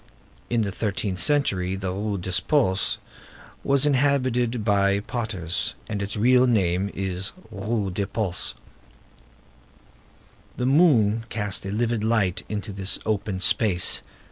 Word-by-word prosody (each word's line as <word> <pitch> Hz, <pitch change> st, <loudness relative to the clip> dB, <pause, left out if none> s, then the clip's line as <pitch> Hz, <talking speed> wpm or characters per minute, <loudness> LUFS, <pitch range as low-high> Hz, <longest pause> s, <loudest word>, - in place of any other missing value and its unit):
In 120 Hz, -1 st, +1 dB
the 100 Hz, -2 st, -1 dB
thirteenth 100 Hz, -2 st, -2 dB
century 95 Hz, -11 st, +1 dB
this 95 Hz, 0 st, -4 dB
Rue 100 Hz, +2 st, -2 dB
des 90 Hz, 0 st, 0 dB
Postes 120 Hz, -11 st, +2 dB, 0.7 s
was 140 Hz, 0 st, +2 dB
inhabited 130 Hz, -5 st, +1 dB
by 100 Hz, -1 st, +3 dB
potters, 100 Hz, -7 st, -2 dB
and 105 Hz, -2 st, -3 dB
its 100 Hz, +2 st, -3 dB
real 125 Hz, +4 st, +4 dB
name 95 Hz, -4 st, +1 dB
is 95 Hz, 0 st, -3 dB, 0.2 s
Rue 105 Hz, -1 st, -2 dB
des 100 Hz, +2 st, -2 dB
Pots. 100 Hz, -3 st, -3 dB, 2.0 s
The 125 Hz, -, -1 dB
moon 120 Hz, -7 st, +4 dB
cast 100 Hz, -3 st, -2 dB
a -, -, -3 dB
livid 115 Hz, +1 st, -1 dB
light 110 Hz, -5 st, +1 dB
into 105 Hz, -1 st, -4 dB
this 95 Hz, 0 st, +1 dB
open 105 Hz, -3 st, -1 dB
space. 95 Hz, -2 st, +3 dB
105 Hz, 125 wpm, -24 LUFS, 95-120 Hz, 2.0 s, real